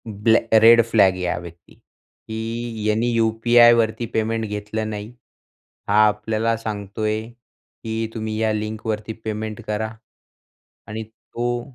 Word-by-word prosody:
ब्लॅ 110 +1 +3 0.2
red 115 +1 +8
flag 100 -4 +5
आहे 90 -1 -4
हा - - -1
व्यक्ती 85 -1 -13
की 115 0 -7
यांनी 110 +3 +1
यू-पी-आय 115 +1 +5
वरती 115 0 +1
पेमेंट 110 0 0
घेतलं 105 +1 -4
नाही. 105 0 -6 0.8
हा 100 - +1
आपल्याला 110 +2 0
सांगतोय 110 0 -3
की 115 -1 -7
तुम्ही 110 -1 -4
या 110 -1 +1
लिंकवरती 110 0 -3
पेमेंट 110 +1 -4
करा 105 +1 -2 1.0
आणि 110 +1 -5
तो 120 +2 -4
110 Hz, 125 wpm, -22 LUFS, 105-115 Hz, 1.0 s, red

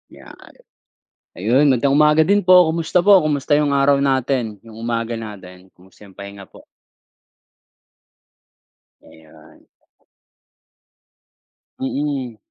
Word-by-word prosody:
Yan. - - -15 1.0
Ayun 120 +10 +1
magandang 135 0 +1
umaga 150 +1 +4
din 200 +5 +1
po 185 - +6 0.2
kumusta 165 +2 -1
po 200 0 +6
kumusta 145 -3 0
'yong 145 -2 0
araw 140 0 +2
natin? 130 -4 -1
Yung 115 -1 -15
umaga 115 0 -4
natin? 95 -4 -12
Kumusta 95 +3 -20
yong 95 - -19
pahinga 100 0 -11
po? - - -18 2.4
Ayan. 80 0 -20 2.1
Mm. 135 -3 -4
130 Hz, 100 wpm, -18 LUFS, 105-145 Hz, 2.4 s, po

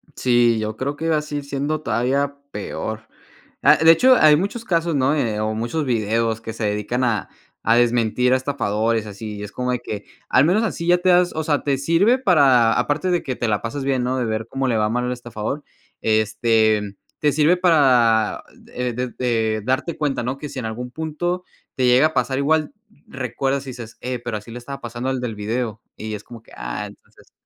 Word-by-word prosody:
Sí, 120 -2 +3
yo 110 0 -3
creo 140 +2 -2
que 165 +2 -3
así 150 -1 -2
siendo 140 +2 -2
todavía 140 +2 0 0.2
peor, 110 +1 -5 0.5
ah, - - +6
de 165 - +9
hecho, 255 +10 +6
hay 155 -1 +7
muchos 205 +7 -3
casos, 170 -3 0
¿no?, 140 +2 +2
eh, 115 -8 -1
o 110 0 -1
muchos 120 +8 -2
videos 115 -1 0
que 115 0 -6
se 110 -1 -3
dedican 105 +5 -1
a 115 -4 0 0.3
a 115 - +4
desmentir 120 +1 +2
a 130 - +4
estafadores, 115 -5 -1
así, 105 0 -7
es 105 - -7
como 125 0 -2
de 125 - 0
que 105 -3 -6 0.2
al 130 - +5
menos 195 +7 +3
así 175 -5 -3
ya 175 0 +5
te 185 +1 +1
das, 180 0 +4
o 160 - -1
sea, 150 -2 +1
te 140 -2 +1
sirve 170 - +3
para, 135 - +4
aparte 155 +5 0
de 175 - +1
que 130 -2 -3
te 120 - -2
la 105 -1 0
pasas 135 +4 -4
bien, 130 -2 +1
¿no?, 130 +1 -1
de 125 - 0
ver 110 0 -3
cómo 135 0 -2
le 120 -3 +1
va 105 0 +1
mal 125 +2 -1
el 125 - -2
estafador, 120 +3 -5 0.4
este, 110 -1 +2 0.2
te 150 - +2
sirve 155 +5 +3
para, 125 - +3 0.3
eh, 125 -1 -2
desde 115 -3 -1
darte 130 +7 -1
cuenta, 140 -5 -1
¿no?, 130 +3 -3
que 150 -1 -6
si - - -9
en 120 - -5
algún 120 +3 -5
punto 160 +4 -3 0.3
te 130 - +1
llega 125 +5 +5
a 155 - -9
pasar 130 +2 0
igual, 155 +2 +1 0.3
recuerdas, 135 +1 -2
y - - -4
dices: 120 -3 -10
"Eh, 125 0 -3
pero, 120 -2 -4
así 105 +2 -12
le 120 - -7
estaba 140 +3 -8
pasando 120 +2 -4
al 130 -1 -2
del 115 -4 -4
video", 110 +1 -3 0.2
y 110 0 -5
es 105 - -9
como 115 -2 -12
que, - - -21
ah, - - -5
entonces. - - -19
125 Hz, 210 wpm, -21 LUFS, 115-145 Hz, 0.5 s, de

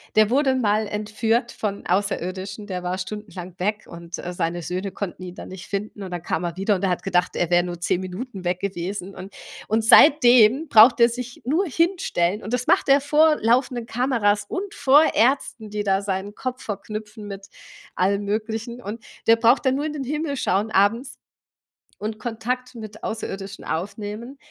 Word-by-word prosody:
der 215 -1 +5
wurde 270 +2 +3
mal 215 -4 +1
entführt 220 +3 -1
von 200 -2 -4
Außerirdischen, 195 +1 -2
der 180 -3 -4
war 180 +1 -2
stundenlang 185 -3 -7
weg 210 +3 -2
und, 170 0 -8
äh, 180 - -5
seine 175 -1 -2
Söhne 185 +4 -4
konnten 185 -2 -6
ihn 180 -1 -7
dann - - -9
nicht 185 -1 -9
finden 205 0 -5
und 185 - -7
dann 175 -1 -4
kam 175 - -2
er 170 -1 -3
wieder 195 +2 +1
und 185 - -5
er 190 - +2
hat 180 - -1
gedacht, 180 -1 0
er 175 - 0
wär 175 0 +4
nur 175 -1 -6
10 175 - +1
Minuten 190 +2 -7
weg 175 +1 0
gewesen 195 0 -4
und 195 +2 -10 0.3
und 220 +1 +1
seitdem 250 +1 +6
braucht 230 0 +7
er 235 - +6
sich 245 0 -7
nur 320 +10 +1
hinstellen 300 - 0
und 220 - -5
das 250 0 -1
macht - - +3
er 275 +1 +6
vor 300 +2 +4
laufenden 240 +1 +1
Kameras 230 -5 +1
und 395 +2 -5
vor 280 +3 +5
Ärzten, 240 -3 +1
die 210 0 -2
da 195 0 +1
seinen 200 +1 -3
Kopf 255 0 -5
verknüpfen 210 +1 -6
mit 195 -1 -8 0.5
allem 200 +2 +1
Möglichen 220 +3 -3
und 220 +3 -6 0.2
der 225 - +6
braucht 230 +4 +3
dann 260 - +3
nur 290 +2 -2
in 310 - -3
den 290 -2 -4
Himmel 295 +1 -3
schauen 205 0 0
abends 225 +6 +1 0.8
und 215 +1 -4
Kontakt 245 +3 -4
mit 215 -2 -10
Außerirdischen 195 -3 -5
aufnehmen 210 - -5
210 Hz, 185 wpm, -23 LUFS, 190-245 Hz, 0.8 s, braucht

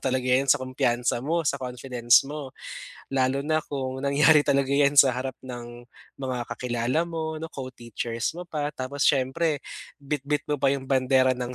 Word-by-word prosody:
talaga 130 -1 0
'yan 130 +2 +3
sa - - +5
kumpiyansa 120 -2 0
mo, 165 +3 0
sa 140 -1 0
confidence 125 -1 +2
mo. 145 -3 -6 0.6
Lalo 130 0 +1
na 155 0 +1
kung 130 -2 -4
nangyari 145 +2 +5
talaga 140 -1 +1
'yan 140 0 +3
sa 135 -2 +7
harap 130 0 -4
ng 120 -1 -9 0.3
mga 130 -2 -3
kakilala 125 +5 -1
mo 160 -1 -4
'no, 160 - -5
co-teachers 120 -2 -4
mo 180 - -6
pa. 150 -2 -3
Tapos 135 +2 -3
siyempre 140 +3 +1 0.4
bitbit 145 +1 -2
mo 150 - +2
pa 135 -1 +3
yung 135 -1 -6
bandera 130 -1 +3
ng 125 0 -4
135 Hz, 165 wpm, -26 LUFS, 125-145 Hz, 0.6 s, sa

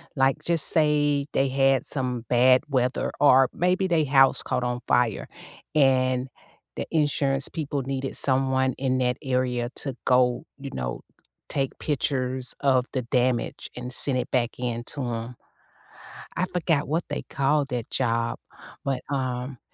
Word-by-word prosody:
like, 135 +2 +1
just 170 -2 +1
say 145 -2 +2
they 135 0 +2
had 135 0 +2
some 125 -4 -2
bad 125 +1 +5
weather 130 -2 0
or 135 -2 +6
maybe 180 +2 +1
they 160 -4 +2
house 135 -1 +4
caught - - -2
on 125 0 -2
fire 120 -4 +1 0.5
and 130 -3 +3 0.5
the - - -3
insurance 140 -3 +1
people 145 -4 -3
needed 135 0 -3
someone 130 -1 +2
in 130 -1 0
that 125 0 0
area 125 -2 -1
to 135 -2 -1
go, 125 +2 +2
you 140 -1 -8
know, 60 -1 -4 0.5
take 135 -1 -2
pictures 130 -3 -2
of 130 -2 +2
the 130 - -1
damage 125 0 -1
and 125 +1 -3
send 130 -1 +3
it 125 - -3
back 120 -2 0
in 120 -1 -3
to 145 - -1
'em. 120 0 -4 1.0
I 180 - +1
forgot 165 -5 0
what 160 +3 -1
they - - -3
called 140 +1 +1
that 120 -3 -4
job. 115 -2 0 0.5
But, 135 -2 -1
um 130 -2 -3
130 Hz, 150 wpm, -25 LUFS, 125-140 Hz, 1.0 s, or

